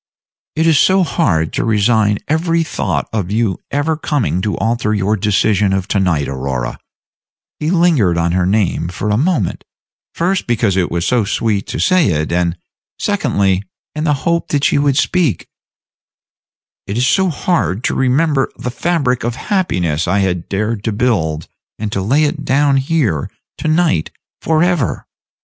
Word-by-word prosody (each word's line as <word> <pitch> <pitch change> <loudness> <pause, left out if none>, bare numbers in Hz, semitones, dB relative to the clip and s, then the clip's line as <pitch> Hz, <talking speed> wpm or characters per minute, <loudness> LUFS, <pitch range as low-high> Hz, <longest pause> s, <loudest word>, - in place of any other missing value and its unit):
"It 160 +1 +1
is 160 -4 +4
so 190 0 +4
hard 85 - 0
to - - -1
resign 105 -1 +2
every 165 +2 +1
thought - - -2
of 100 -5 -2
your 105 -3 0
ever 145 +3 0
coming 145 - -1
to 105 +1 -2
alter 110 -2 0
your 105 +1 +1
decision 105 -1 +1
of 95 -1 -1
tonight, 90 -8 +1
Aurora" 65 -2 -3 0.8
he 150 - -1
lingered 165 - +3
on 85 0 +1
her 90 0 +1
name 95 -4 0
for 95 +4 -3
a - - +2
moment, 140 - 0 0.5
first 185 +3 0
because 115 -5 +1
it 90 -2 +1
was 85 0 -2
so 125 -3 +2
sweet 105 0 -1
to - - -4
say 185 -4 +3
it, 75 0 -2
and, 85 0 0 0.4
secondly, 95 -2 0 0.3
in 155 - -3
the 150 -2 +2
hope 170 0 +1
that 145 -1 -1
she 145 - +3
would 140 -2 +2
speak 170 - +1 1.4
"it 100 - -3
is 125 - +2
so 190 +6 +2
hard 150 - -1
to - - 0
remember 135 +2 +1
the 125 - -4
fabric 140 -4 0
of 120 0 -2
happiness 90 - -1
I 95 +3 +1
had 90 -3 -2
dared 105 +1 -2
to 110 - 0
build, 95 -9 0 0.3
and 105 -1 -4
to 100 - -1
lay 135 +11 +2
it 150 0 -1
down 140 0 +2
here 135 - 0 0.3
to 160 - -3
night 155 - +1 0.3
for 160 0 +2
ever." 175 -7 0
115 Hz, 165 wpm, -16 LUFS, 95-155 Hz, 1.4 s, is